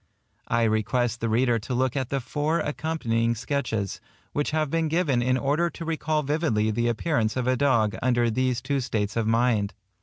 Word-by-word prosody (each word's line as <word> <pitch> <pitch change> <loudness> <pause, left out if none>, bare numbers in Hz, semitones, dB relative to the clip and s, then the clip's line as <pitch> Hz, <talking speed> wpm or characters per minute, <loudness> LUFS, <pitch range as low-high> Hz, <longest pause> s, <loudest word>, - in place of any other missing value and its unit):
I 115 0 +1
request 115 +2 0
the 115 - 0
reader 120 +1 +2
to 125 +4 -4
look 130 +1 +1
at 130 -3 -1
the 135 - 0
four 150 +6 -1
accompanying 120 -7 -1
sketches, 115 -5 -2 0.3
which 145 - 0
have 155 -2 0
been 165 -1 +1
given 155 -6 +1
in 130 +1 +2
order 145 +6 +1
to 165 - -8
recall 155 -1 -1
vividly 140 -8 +1
the 120 +2 0
appearance 115 -1 0
of 125 - 0
a 130 0 +2
dog 115 -6 +2
under 120 -2 +2
these 125 +1 0
two 140 -2 0
states 110 -5 -2
of 115 -2 0
mind. 115 -3 +1
125 Hz, 185 wpm, -26 LUFS, 115-145 Hz, 0.3 s, reader